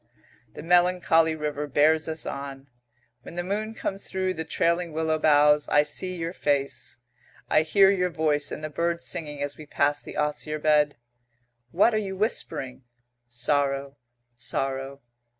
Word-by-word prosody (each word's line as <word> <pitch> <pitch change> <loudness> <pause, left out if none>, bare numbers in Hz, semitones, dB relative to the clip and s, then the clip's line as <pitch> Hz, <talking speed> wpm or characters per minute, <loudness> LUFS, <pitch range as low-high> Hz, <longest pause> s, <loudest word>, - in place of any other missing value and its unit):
The - - -8
melancholy 175 -2 +3
river 150 -1 -3
bears 155 +3 +3
us 160 -1 -4
on. 140 -1 -7 0.5
When 165 - -11
the 175 - -2
moon 215 +4 -3
comes 195 -2 -4
through 185 0 -1
the 160 -2 -4
trailing 170 +1 0
willow 160 0 0
boughs, 150 -1 +4
I 150 - +5
see 180 +5 -3
your 165 0 -4
face, 140 -5 -2 0.5
I - - +5
hear 195 +5 +5
your 180 -2 +1
voice 155 -3 0
and 155 - -6
the 155 - -4
bird 170 +3 -1
singing 150 -3 -2
as 145 0 -5
we 155 - -11
pass 145 0 +1
the - - -9
osier 150 +1 -1
bed. 150 -1 +2 0.7
What 200 - +3
are 215 - +2
you 190 -2 -5
whispering? 155 - -1 0.5
Sorrow, 140 +2 -1 0.4
sorrow. 135 +2 -3
155 Hz, 150 wpm, -26 LUFS, 145-175 Hz, 0.7 s, I